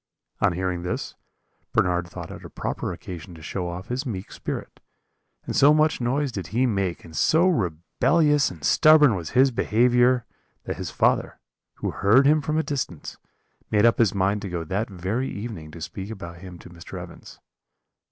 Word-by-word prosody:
"On 100 -3 +2
hearing 90 0 -2
this, 90 - -4 0.6
Bernard 90 -1 +1
thought 85 -1 -8
it - - -10
a - - -9
proper - - -4
occasion 90 0 -8
to 80 - -13
show 90 +4 -3
off 90 +2 -7
his 125 +2 -2
meek 100 -6 -5
spirit, - - -6 0.7
and - - -4
so 145 +2 +6
much 155 -3 +2
noise 135 +3 0
did 95 -7 -5
he 125 +4 +1
make, 100 -7 -1
and 80 -1 -12
so 160 - +4
rebellious 140 - +2
and 80 -5 -12
stubborn 155 - +6
was 85 -5 -4
his 135 +1 +6
behaviour, 120 +2 +3 0.4
that - - -5
his - - -4
father, - - +1 0.4
who - - -3
heard 110 +8 +4
him 150 +2 +4
from 155 +1 -1
a 160 - +2
distance, 130 - -4 0.5
made 105 +1 +3
up 115 - +4
his 110 -4 +3
mind 100 +2 +1
to 100 - -5
go 85 -2 -3
that 100 +7 -2
very 100 +8 -2
evening 100 -8 -6
to 85 - -11
speak 95 +4 -6
about 85 -6 -8
him 90 -1 -10
to - - -13
Mr. 85 -1 -9
Evans. - - -11
100 Hz, 180 wpm, -24 LUFS, 90-130 Hz, 0.7 s, so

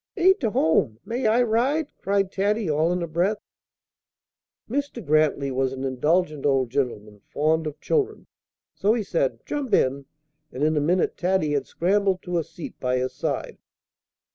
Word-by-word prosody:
"Ain't 380 +2 +5
to 225 - 0
home: 155 - +1
may 235 +3 -1
I 230 +3 +4
ride?" 250 +8 0
cried 195 -1 0
Taddy, 205 +1 0
all 155 +2 +2
in 180 -1 -1
a - - -3
breath. 175 +6 0 1.3
Mr. 265 -3 -3
Grantly 150 -2 +2
was 130 0 0
an 135 0 -5
indulgent 150 +3 0
old 135 -4 +2
gentleman, 105 -6 -2
fond 155 +2 +1
of 150 - -6
children: 435 -2 -1 0.5
so 210 +3 +2
he 230 - -1
said, 135 - -1
"Jump 270 -8 0
in;" 135 +1 0 0.4
and 130 - -4
in 155 +1 +2
a 150 - +2
minute 175 +5 +1
Taddy 180 -4 +1
had 145 -1 -1
scrambled 195 +1 +1
to 175 -1 -1
a - - -1
seat 165 - -10
by 125 0 0
his 130 0 -2
side. - - -3
170 Hz, 165 wpm, -24 LUFS, 140-210 Hz, 1.3 s, Ain't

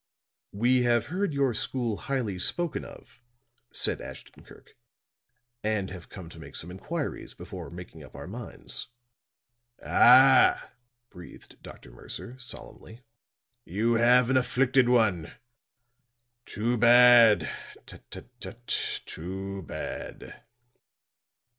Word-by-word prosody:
"We 125 +5 +2
have 120 -1 +2
heard 195 -1 -1
your 140 -3 +1
school 120 -1 -2
highly 120 -9 -3
spoken 170 - -1
of," - - -14 0.5
said - - -2
Ashton - - -11
Kirk. - - -18 0.9
"And 105 -3 -1
have 90 -2 -10
come 95 -5 -10
to 85 - -13
make 75 -3 -11
some 85 - -8
inquiries 150 - -5
before - - -9
making 90 +1 -11
up - - -15
our 70 - -8
minds." 110 +6 -7 1.0
"Ah," 130 +2 +6 0.4
breathed 90 -1 -14
Dr. - - -13
Mercer, 120 - -9
solemnly, 120 -1 -10 0.6
"you 110 +6 0
have 120 +2 +4
an 130 - +4
afflicted 130 0 +2
one. 105 -10 +1 1.1
Too 120 +3 -1
bad! 120 - +7 0.4
Tut, - - -12
tut, - - -10
tut, 120 +1 -10 0.4
too 95 +3 -6
bad!" 80 - -8
120 Hz, 110 wpm, -27 LUFS, 95-125 Hz, 1.1 s, bad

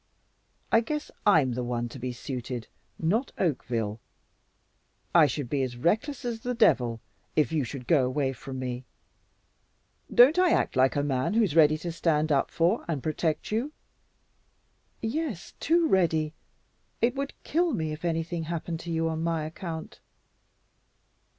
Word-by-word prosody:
I 225 - +6
guess 300 +5 -4 0.2
I'm 155 -10 +5
the 125 +1 -2
one 120 -1 -2
to 130 - -9
be 125 +1 -3
suited, 125 -1 -5 0.3
not 215 +11 0
Oakville. 120 - -1 1.1
I 165 -3 +7
should 140 -1 -3
be 140 +3 0
as 125 -2 -3
reckless 220 - 0
as 235 -2 -2
the 245 +2 -3
devil 120 - +3 0.3
if 150 -5 +2
you 155 -3 +1
should 125 +1 -6
go 150 -3 +4
away 135 0 0
from 135 +1 -8
me. 125 -1 -4 1.3
Don't 275 +9 +7
I 365 -2 +5
act - - +1
like 130 +1 +3
a 145 - +1
man 135 +6 0
who's 215 -9 +2
ready 155 -1 +6
to 170 +2 -4
stand 155 -2 +1
up 140 - +2
for 175 +7 +1
and 150 -6 -2
protect 155 +2 -1
you?" 245 +8 -1 1.3
"Yes, 240 - -3
too 335 +1 +3
ready. 160 - +2 0.7
It 240 +1 +2
would 275 0 -3
kill 340 +2 +1
me 160 - -2
if 155 +2 -7
anything 165 0 -1
happened 170 0 -4
to 170 0 -6
you 165 0 0
on 160 0 -2
my 165 -2 -1
account." 160 0 -7
160 Hz, 155 wpm, -28 LUFS, 135-210 Hz, 1.3 s, I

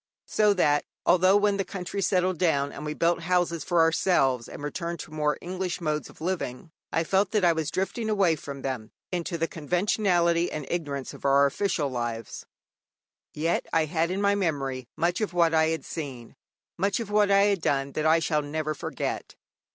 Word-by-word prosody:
So 210 -1 +3
that 150 -5 +3 0.2
although 185 +2 +5
when 205 -1 +2
the 195 - 0
country 190 +1 -5
settled 185 -1 +1
down, 145 -5 +2
and 145 - -8
we 150 0 -3
built 170 0 +1
houses 170 -2 0
for 175 -2 +2
ourselves 135 -7 +2
and - - -9
returned 170 +2 -4
more 150 -1 0
to - - -19
English 185 0 -3
modes 155 -3 -2
of - - -17
living, 160 -5 -3 0.2
I 165 - +1
felt 190 +3 +2
that 210 -4 +3
I 170 - +5
was 160 -2 -2
drifting 220 +6 -2
away 195 -6 +3
from 140 -2 -8
them 125 -5 -4 0.2
into 175 -1 -2
the 165 0 0
conventionality 175 +1 +1
and 150 -2 -4
ignorance 145 -6 -3
of - - -13
our 140 0 +5
official 150 +1 0
lives, 120 -3 -5 0.9
yet 165 +3 0
I 160 -1 +3
had 160 +2 0
in 190 +2 -2
my 200 0 +4
memory 135 -10 -2
much 175 +5 0
of 205 -5 -1
what 170 -2 +3
I 160 0 +4
had 160 0 -2
seen, 135 -7 -7 0.4
much 200 +3 +1
of 220 -3 -5
what 210 -1 +4
I 200 0 +5
had 200 -3 +2
done, 140 -2 0
that 155 +2 0
I 160 +1 +6
shall 155 -2 +1
never 155 +1 -3
forget. - - -4
165 Hz, 190 wpm, -27 LUFS, 150-185 Hz, 0.9 s, I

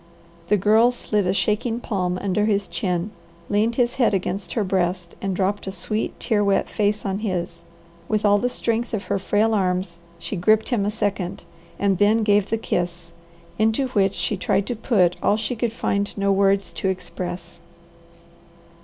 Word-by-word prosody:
The 210 - +3
Girl 220 +5 +5
slid 210 -5 -1
a 185 - +2
shaking 225 +4 0
palm 180 -6 -2
under 200 +2 0
his 200 -3 +1
chin, 180 +1 -2 0.4
leaned 220 +3 +1
his 240 -1 +2
head 235 -6 +3
against 190 +1 -3
her 220 - +1
breast, 180 -2 -1
and 195 -1 -2
dropped 195 +2 -1
a - - -2
sweet, 215 +3 -3
tear 210 -2 +1
wet 200 -1 +2
face 210 0 0
on 195 0 -1
his. 175 -5 -3 0.4
With 215 -1 0
all 205 0 +5
the 245 - 0
strength 230 -1 -1
of 200 - -4
her 195 - -1
frail 210 +3 +1
arms 180 -3 0 0.2
she 170 - -5
gripped 215 +5 +3
him 230 -6 +1
a - - +2
second, 200 -4 -2 0.3
and 195 -2 +1
then 215 +2 +4
gave 205 -1 +3
the 225 - +1
kiss, 175 -5 -3 0.5
into 220 +5 +2
which 195 -5 +1
she 210 - -1
tried 195 +1 +1
to 245 - -3
put 195 -6 +2
all 205 - +3
she 220 +3 -2
could 235 0 -1
find 200 -3 -2
no 200 0 +2
words 195 0 +2
to 190 - -2
express. 180 -2 -5
200 Hz, 180 wpm, -23 LUFS, 185-220 Hz, 0.5 s, Girl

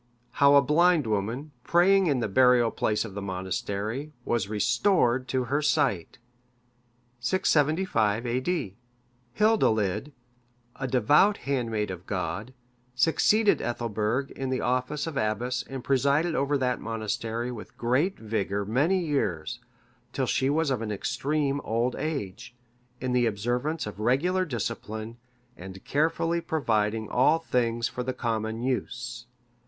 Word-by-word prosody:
How 140 0 +5
a 140 - +7
blind 165 +3 +3
woman, 115 +8 -2
praying 190 +2 +4
in 135 -5 +1
the - - 0
burial 120 +2 +4
place 105 +1 0
of 105 - -8
that 100 - -5
monastery, 100 +7 -3
was 115 -5 0
restored 120 - +2
to 130 0 0
her 140 +5 0
sight. 100 - 0 1.0
[675 145 - +1
A.D.?] 125 - -2 0.6
Hildilid, 145 - +2 0.7
a 135 - -3
devout 145 - +4
handmaid 115 -7 -1
of 90 0 -9
God, 100 +6 -4 0.4
succeeded 200 - +3
Ethelburg 120 +2 -2
in 135 -1 -4
the 130 - -1
office 130 +4 -1
of 160 -4 -5
abbess 120 +2 -1
and 135 -2 -6
presided 140 +5 +2
over 140 0 +1
that 125 -2 -1
monastery 115 +2 -3
with 115 -3 -10
great 130 +11 +1
vigour 100 -2 -2
many 160 - +1
years, 90 - -2 0.5
till - - 0
she 130 - +1
was 155 0 +1
of 125 -4 -1
an 110 -2 -3
extreme 140 +7 -1
old 115 +3 0
age,(585) 120 -1 -7
in 130 - -1
the 125 -1 +3
observance 120 +9 -2
of 105 -2 -8
regular 170 +12 +1
discipline, 110 - -5 0.4
and 95 +1 -10
carefully 165 +3 +1
providing 110 -8 0
all 140 +8 +3
things 120 -7 0
for 125 - -5
the 130 +1 -2
common 115 -1 -2
use. 120 -1 -3
125 Hz, 130 wpm, -27 LUFS, 110-145 Hz, 1.0 s, a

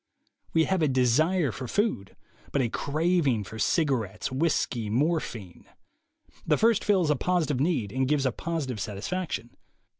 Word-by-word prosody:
AVe 160 - +5
have 190 +1 0
a 155 - +3
desire 140 +5 +2
for 130 +1 -6
food, 165 - -1 0.4
but - - 0
a 120 -3 +1
craving 150 - +1
for 110 +3 -9
cigarettes, 130 - 0
whiskey, 130 -6 0
morphine. 120 - -2 0.8
The - - +2
first 225 -1 +3
fills 185 -7 +2
a - - +3
positive 155 -3 0
need 135 - 0
and 130 +2 0
gives 145 -1 +1
a 130 - +2
positive 140 -5 -3
satisfaction. 120 - -4
140 Hz, 145 wpm, -27 LUFS, 120-170 Hz, 0.8 s, AVe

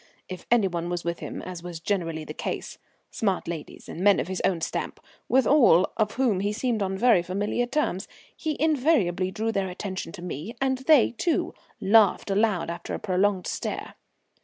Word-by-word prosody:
If 185 -1 -8
any 235 -5 +4
one 170 -1 -3
was 175 -1 -3
with 170 0 -3
him, - - -6
as 180 -2 -7
was 175 -2 -7
generally 165 -3 -2
the 150 - -7
case - - -5 0.3
smart 195 -4 -1
ladies 165 -3 -7
and - - -7
men 200 0 +5
of 135 +7 -3
his 185 - -3
own 180 -3 +1
stamp, - - -3 0.3
with 260 0 +4
all 235 - +5
of 215 -2 0
whom 235 -7 +1
he 200 +2 0
seemed 230 -1 -1
on 195 -1 -1
very 230 -4 +5
familiar 205 +7 -1
terms 245 - -1 0.3
he 310 -2 -3
invariably 255 - +2
drew 220 +3 -2
their 195 -3 -1
attention 185 -2 -5
to 180 -3 -9
me, 180 - -6
and 265 -1 0
they, 275 -2 +5
too, 315 +8 -1 0.3
laughed 205 -1 +4
aloud 195 -4 +1
after 170 0 -5
a - - -5
prolonged 190 -1 +1
stare. - - -4
195 Hz, 185 wpm, -26 LUFS, 175-230 Hz, 0.3 s, men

